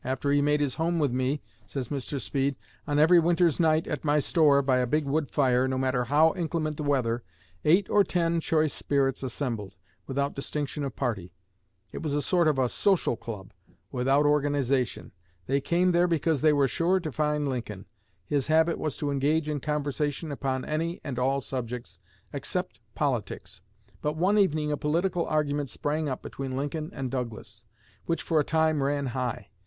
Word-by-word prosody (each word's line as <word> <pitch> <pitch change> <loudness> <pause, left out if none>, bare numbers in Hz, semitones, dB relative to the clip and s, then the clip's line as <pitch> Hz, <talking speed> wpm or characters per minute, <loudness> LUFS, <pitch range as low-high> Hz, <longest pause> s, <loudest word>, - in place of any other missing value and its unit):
"After 130 +2 -1
he 145 0 +4
made 150 +1 +2
his 140 -3 0
home 170 +1 +1
with 145 -5 +1
me," 130 +3 -1 0.2
says 130 -4 -4
Mr. 140 0 -3
Speed, 140 +1 -1 0.3
"on 145 -1 0
every 165 +4 +6
winter's 170 -1 +2
night 160 -1 +3
at - - -4
my 150 -1 +2
store, 145 -2 +4
by 130 -1 +2
a 125 -1 +1
big 150 +4 +1
wood 145 +2 0
fire, 130 -2 +2
no 130 0 -1
matter 130 -1 0
how 155 +5 +4
inclement 160 -3 -2
the - - -4
weather, 125 -5 0 0.4
eight 180 +6 +4
or 205 - +4
ten 170 -3 0
choice 155 -2 +1
spirits 135 -2 0
assembled, 120 -6 -4 0.3
without 140 +1 -1
distinction 145 +1 -3
of 135 -4 -4
party. 95 -9 -3 0.6
It - - -6
was 150 -3 -2
a 145 - +1
sort 175 -3 +2
of 135 -5 +2
social 195 -10 +2
club 105 -5 -8 0.4
without 135 +3 +2
organization. 140 -4 +1 0.3
They 140 +1 +1
came 180 +4 +2
there 175 +1 +3
because 160 -3 +1
they 155 0 +5
were 140 -2 +3
sure 175 +7 +1
to 160 -4 -5
find 150 0 0
Lincoln. 115 -7 -4 0.4
His 140 +6 0
habit 160 +2 +3
was 155 -3 -2
to 145 -1 -2
engage 145 +3 +1
in 150 -1 -1
conversation 150 +1 -2
upon 135 -2 -2
any 165 +3 -2
and 130 -4 -4
all 135 +2 +1
subjects 125 -7 -5 0.3
except - - -3 0.2
politics. - - -2 0.4
But 150 +1 -1
one 195 +5 +3
evening 155 -6 +2
a 150 - 0
political 170 +4 0
argument 145 -2 0
sprang 150 +3 -2
up 130 - -4
between 135 -1 -5
Lincoln 150 +3 -3
and 130 -7 -4
Douglas, 115 -2 -5 0.4
which 165 - -1
for 160 -2 +2
a - - +3
time 160 -1 +1
ran 140 +1 0
high. 125 -3 -3
145 Hz, 180 wpm, -27 LUFS, 130-155 Hz, 0.6 s, every